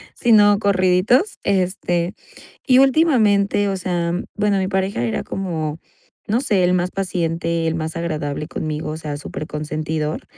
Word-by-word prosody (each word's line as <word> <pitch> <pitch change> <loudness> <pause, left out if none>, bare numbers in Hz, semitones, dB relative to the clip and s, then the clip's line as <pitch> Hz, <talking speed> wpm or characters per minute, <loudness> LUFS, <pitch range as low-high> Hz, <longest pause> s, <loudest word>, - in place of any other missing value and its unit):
sino 205 -3 +5
corriditos. 200 - +2
Este, 180 -2 0 0.5
y 255 0 +5
últimamente, 220 -9 +3
o 195 - -2
sea, 175 -2 -1 0.2
bueno, 205 -1 +1
mi 190 0 0
pareja 190 -9 -1
era 115 - -2
como, 160 -5 -3 0.5
no 225 +4 +1
sé, 205 -9 +1
él 180 +1 +3
más 180 0 0
paciente, 170 -3 -1
él 160 - 0
más 160 0 -4
agradable 150 -3 -3
conmigo, 155 -2 -4
o 155 - -5
sea, 150 -2 -5
superconsentidor. 155 +1 -4
180 Hz, 140 wpm, -20 LUFS, 160-200 Hz, 0.5 s, sino